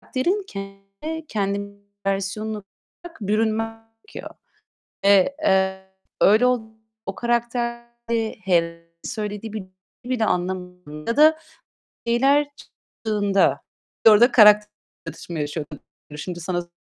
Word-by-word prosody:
Karakterin 360 +11 -1
kendine 195 +10 -7
-kendi 200 -1 -2 0.3
versiyonunu 200 +2 -2 0.4
bırak 340 -2 -11
bürünmem 225 +2 -1 0.2
gerekiyor. - - -9 0.7
Eee, 200 +7 +5
eee, 190 0 +2 0.4
öyle 215 +5 +6
ol 250 -2 +3 0.4
o 195 - -4
karakterde 235 -1 -2
he 170 -2 0 0.2
söylediği 215 -2 -5
bir 215 - -3
cümleyi 185 +6 -7
bile 220 - +3
anlamadığımda 180 - -3
da 315 +1 +6 0.7
şeyler 275 +5 +3
çıktığında 205 -3 -1 0.5
orada 220 +4 +7
karakter 210 -2 +7 0.4
çatışması 170 -3 -6
yaşıyorum. 150 0 -5 0.4
Şimdi 175 +3 -6
sana 175 0 -3
210 Hz, 100 wpm, -23 LUFS, 190-235 Hz, 0.7 s, orada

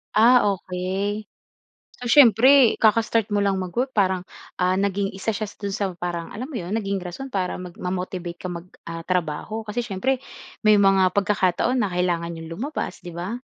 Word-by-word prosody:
Ah, 240 +3 +6 0.2
okey. 190 +4 -3 0.7
So, 245 - -7
siyempre 250 0 +6
kaka-start 225 0 +3
mo 205 - +2
lang 195 -1 +1
mag-work 215 +9 -2
parang, 190 -5 +1 0.3
ah, 185 +1 +1
naging 200 0 0
isa 200 +3 -3
siya 215 -1 -4
do'n 200 -1 -4
sa 200 -3 -1
parang 175 -1 -4
alam 250 +5 -6
mo 295 - -11
'yon, 180 -4 -4
naging 195 -3 -2
rason 180 +10 -6
para 190 -8 -2
mag 180 -1 -8
ma-motivate 180 -1 -4
ka - - -7
mag, 175 0 -7 0.2
ah, 165 0 -6
trabaho. 180 +5 -2
Kasi 220 +3 -2
siyempre 245 +5 -1 0.4
may 215 -1 +5
mga 195 -2 +4
pagkakataon 205 +5 +1
na 200 - -1
kailangan 175 -1 -1
n'yong 165 -1 -8
lumabas, 275 - -4
'di 175 - -8
ba? 190 +7 -3
195 Hz, 175 wpm, -23 LUFS, 180-220 Hz, 0.7 s, Ah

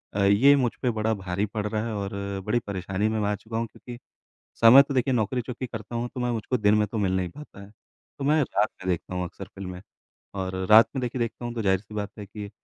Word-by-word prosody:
अ, 100 - +2
ये 105 +9 +6
मुझ 125 -4 +1
पे 125 - +1
बड़ा 110 0 0
भारी 95 0 -2
पड़ 105 0 -4
रहा 110 +1 -2
है 115 - -3
और 100 +1 -4
अ, 100 0 -4
बड़ी 120 - +1
परेशानी 95 +1 -1
में 110 0 -1
मैं 105 -1 0
आ 105 - 0
चुका 110 +3 -6
हूँ, 115 0 -1
क्योंकि 120 +2 -11 0.6
समय 115 +4 +10
तो 140 - -5
देखिए 130 0 +1
नौकरी 120 +2 0
चूँकि 125 +1 -6
करता 110 0 -7
हूँ, 120 +1 -1
तो - - -4
मैं 125 - 0
मुझको 115 +2 -1
दिन 105 -1 +3
में 105 0 +2
तो 110 - -5
मिल 95 -3 +1
नहीं 90 -1 -1
पाता 150 - -12
है। 100 +1 -13 0.5
तो - - -3
मैं 150 +2 +4
रात 105 -4 0
में - - -6
देखता 90 +1 -2
हूँ 90 - -1
अक्सर 85 - -9
फ़िल्में। 90 -2 -7 0.5
और 95 -1 -3
अ, 95 - -2
रात 110 +2 +9
में - - 0
देखिए 125 +1 -3
देखता 120 +1 -3
हूँ, 120 - -5
तो 115 - -2
ज़ाहिर-सी 100 +1 0
बात 105 -1 -3
है 105 - -7
कि 100 0 -8
105 Hz, 265 wpm, -26 LUFS, 100-120 Hz, 0.6 s, समय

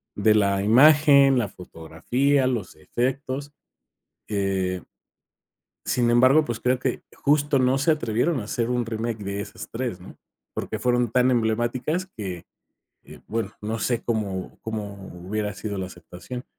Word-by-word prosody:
de 105 +1 +3
la 100 -2 +2
imagen, 140 +3 +6
la 110 - 0
fotografía, 120 - -1
los 115 -8 -3
efectos, 130 - -3 0.8
eh 95 -3 -1 1.1
Sin 120 -1 +1
embargo, 130 +6 +5
pues, 115 -2 -4
creo 125 0 +1
que 130 -1 -2
justo 145 -1 +2
no 130 +1 +3
se 150 +4 +2
atrevieron 125 +2 0
a - - -5
hacer 115 +2 -2
un 125 -1 0
remake 115 0 -3
de 100 +1 -3
esas 105 0 -8
3, 115 -6 -4
¿no?, 90 - -12 0.4
porque 110 - -4
fueron 120 0 +1
tan 125 +1 +3
emblemáticas 120 +9 0
que, 95 -5 -5 0.6
eh, - - -13
bueno, 110 -2 -2
no 110 +2 -3
sé, 120 +2 -1
cómo 100 -5 -3
cómo 105 -2 -5 0.3
hubiera 105 0 -2
sido 100 -2 -5
la 95 - -3
aceptación, 90 +8 -9
115 Hz, 145 wpm, -24 LUFS, 100-130 Hz, 1.1 s, imagen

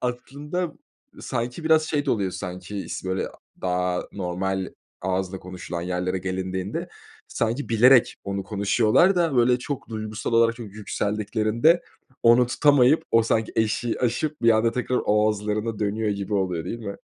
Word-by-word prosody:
A 125 - +1
aslında, 150 +7 -5 0.5
sanki 120 +7 -4
biraz 160 0 +5
şey 145 -2 -1
de - - +2
oluyor, 100 -4 0
sanki 90 +3 -6
is - - -5
böyle 95 0 -1 0.3
daha 90 0 0
normal 95 0 -2 0.3
ağızla 95 0 -2
konuşulan 90 -2 -6
yerlere 90 +1 -2
gelindiğinde 95 +1 -3 0.4
sanki 120 +5 -2
bilerek 120 +2 +5
onu 100 0 -3
konuşuyorlar 110 - +3
da 165 -6 +1
böyle 125 +1 +4
çok 135 +2 -5
duygusal 110 0 -4
olarak; 115 0 +4
çünkü 110 -4 -9
yükseldiklerinde 110 - +1 0.4
onu 120 +1 +6
tutamayıp 140 +3 +4
o 115 - +5
sanki 110 0 0
eşiği 110 +1 0
aşıp 130 +4 -1
bir 115 - +6
anda 115 +1 +3
tekrar 125 0 -1
o 105 0 +3
ağızlarına 105 +1 -1
dönüyor 105 +1 -1
gibi 100 0 -3
oluyor, 90 -4 -1
değil 115 +6 -4
mi? 100 -3 -6
110 Hz, 150 wpm, -24 LUFS, 95-125 Hz, 0.5 s, onu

